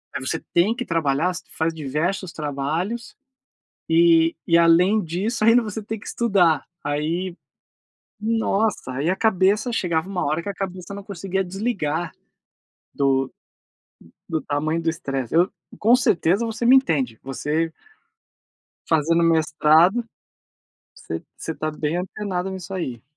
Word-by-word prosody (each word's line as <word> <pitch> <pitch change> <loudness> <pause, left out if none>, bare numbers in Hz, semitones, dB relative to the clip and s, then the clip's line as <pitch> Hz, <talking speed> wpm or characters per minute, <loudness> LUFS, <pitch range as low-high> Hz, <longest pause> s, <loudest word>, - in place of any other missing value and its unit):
aí 120 - -3
você 160 - -1
tem 190 +7 +3
que 250 - -4
trabalhar, 165 +1 +1
você 180 - -7
faz 160 +1 0
diversos 160 +5 -2
trabalhos, 155 +10 -3 0.8
eh, 165 0 +5
e 170 0 +5
além 175 +6 +5
disso, 195 +7 -2
ainda 230 +2 +6
você 220 0 -5
tem 220 +2 -5
que 200 - -14
estudar. 180 - +2 0.2
Aí, 165 +5 -2 0.8
nossa, 220 - 0
aí 140 +6 -1
a 185 - +2
cabeça, 210 +3 +2
chegava 170 -6 0
uma 185 -2 -2
hora 155 +3 0
que 205 - -4
a 200 - -3
cabeça 185 -1 -6
não 200 0 -7
conseguia 195 -1 -3
desligar, 175 -5 -2 0.8
do 135 -1 +1 1.0
do 160 -2 -1
tamanho 155 +3 -1
do 165 0 +1
estresse. 135 -6 -4
Eu 175 +4 +4 0.3
com 230 +4 +5
certeza 200 - +2
você 225 +1 -4
me 250 +3 +7
entende, 140 - +1
você 150 +5 -1 1.2
fazendo 165 +1 +2
mestrado, 160 +5 +4 0.9
você 80 0 -6
você - - -4
está 155 0 -3
bem 150 +1 -2
antenado 185 0 -3
nisso 190 -1 -7
aí. 130 -11 -4
170 Hz, 135 wpm, -23 LUFS, 155-200 Hz, 1.2 s, me